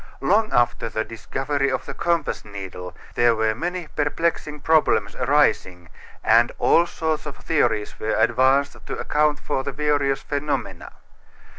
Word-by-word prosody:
Long 215 +3 +2
after 120 -1 +1
the 110 0 -2
discovery 135 +5 -2
of 130 - -2
the - - -6
compass 170 -3 -1
needle 95 -3 -8 0.2
there 120 -1 +3
were 110 0 +1
many 175 +8 -4
perplexing 150 0 -2
problems 160 +1 +2
arising, 95 - +1 0.3
and 115 +2 +4
all 170 +1 +4
sorts 160 -3 -2
of 145 - -7
theories 120 -10 0
were 110 - -1
advanced 130 +5 +2
to - - -4
account 150 0 +1
for 140 -2 -2
the 140 - -3
various 145 -1 0
phenomena. 140 - -3
140 Hz, 140 wpm, -23 LUFS, 115-150 Hz, 0.3 s, and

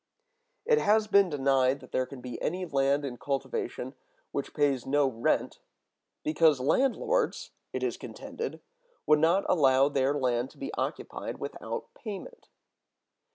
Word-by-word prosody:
It 460 -1 +4
has 215 +1 +3
been 200 -3 +4
denied 135 -2 +2
that 130 - -15
there 130 0 0
can 135 -2 -10
be 125 -1 -7
any 180 +3 -1
land 140 -2 +1
in 125 -3 -5
cultivation 145 - -3 0.4
which - - -4
pays 140 -4 +2
no 145 +1 +3
rent, 115 -3 0 0.6
because 155 -2 +4
landlords 275 - +1 0.2
(it - - -3
is - - -1
contended) 460 0 -6 0.4
would 150 0 +5
not 170 +5 +3
allow 135 -4 +4
their 140 0 +1
land 125 -2 0
to - - -20
be 275 - -5
occupied - - -4
without - - -6
payment. 230 - -8
145 Hz, 140 wpm, -29 LUFS, 135-200 Hz, 0.6 s, would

